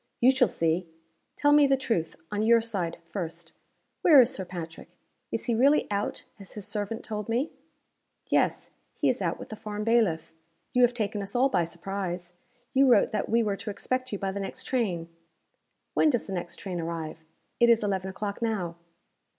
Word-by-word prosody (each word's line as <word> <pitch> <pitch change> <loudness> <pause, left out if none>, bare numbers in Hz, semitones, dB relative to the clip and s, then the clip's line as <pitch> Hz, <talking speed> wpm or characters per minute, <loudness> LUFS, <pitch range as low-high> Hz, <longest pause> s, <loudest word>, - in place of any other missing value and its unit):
"You 250 +2 +6
shall 260 -2 +4
see. 165 +2 0 0.5
Tell 290 - +3
me 290 -1 +7
the 270 0 +3
truth, 180 -12 -1 0.2
on 210 0 -1
your 230 +1 +5
side, 195 -7 -3
first. 165 -1 -6 0.5
Where 310 -6 +8
is 245 - +5
Sir 190 - -4
Patrick? 170 -2 -8 0.4
Is - - -2
he 240 - +1
really 275 +6 +4
out, 200 0 -2
as 195 - -11
his 210 -2 -7
servant 210 +1 -3
told 210 0 -4
me?" 250 +7 0 0.7
"Yes. - - +1 0.2
He - - +2
is - - 0
out - - 0
with - - -9
the 220 - -6
farm 210 -1 -5
bailiff. 215 -8 +2 0.4
You 250 - +3
have 245 0 +4
taken 210 -2 -2
us 200 +2 -5
all 260 +3 +4
by 175 -8 +2
surprise. 175 0 -5 0.4
You 270 0 +5
wrote 235 -5 +5
that - - -2
we 230 +1 +3
were 205 -2 -1
to 200 +3 -6
expect 255 +5 -2
you 205 - -2
by 195 0 -2
the 200 - -4
next 195 - -4
train." 190 -10 -1 0.9
"When 315 - +4
does 240 -5 0
the 195 - -6
next 175 -2 -4
train 180 -3 -4
arrive? 165 -1 -4 0.4
It 235 - +6
is 230 -2 +5
eleven 190 -2 -1
o'clock 200 +3 -5
now." 190 -7 -1
205 Hz, 190 wpm, -28 LUFS, 180-235 Hz, 0.9 s, Where